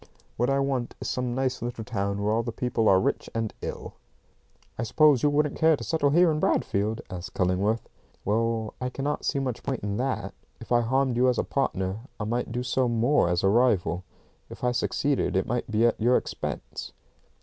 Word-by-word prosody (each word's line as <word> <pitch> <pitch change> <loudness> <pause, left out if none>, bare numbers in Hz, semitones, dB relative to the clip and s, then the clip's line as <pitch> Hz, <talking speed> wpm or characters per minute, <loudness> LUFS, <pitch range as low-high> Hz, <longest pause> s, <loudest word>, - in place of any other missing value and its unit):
"What 120 +3 +1
I 135 - +2
want 135 -3 -1
is - - -5
some 125 -1 -2
nice 130 -1 -1
little 120 -1 -4
town 100 -3 -2
where 105 +1 +1
all 115 - +2
the 115 - -4
people 115 -1 +1
are 95 - +6
rich - - -1
and 115 -2 -1
ill." - - -6 0.8
"I - - -4
suppose 140 +3 +4
you 150 - +4
wouldn't 150 0 +1
care 160 -1 +4
to - - -7
settle 160 -4 +1
here 170 +3 +5
in 155 - -1
Bradfield?" 105 -5 0
asked 90 -1 -7
Cullingworth. 95 +5 +1 0.4
"Well, 110 +1 0
I 125 - -1
cannot 140 +3 -3
see - - 0
much 130 -3 -2
point 130 -6 -3
in 100 0 -2
that. 130 +2 -2 0.3
If - - -12
I 120 -1 +5
harmed 130 +1 +1
you 125 +1 +4
as 125 - +1
a - - +1
partner, 95 -7 -1 0.2
I - - -2
might 120 +2 -2
do 125 +1 -2
so 125 0 +1
more 120 -2 +2
as 90 +1 0
a 95 - +4
rival. 100 -6 +2 0.5
If - - -11
I 125 - +3
succeeded 135 +1 0
it 95 - +2
might 120 0 -2
be 110 +2 +3
at 115 -2 +1
your 120 +3 +5
expense." - - -5
120 Hz, 205 wpm, -27 LUFS, 110-130 Hz, 0.8 s, are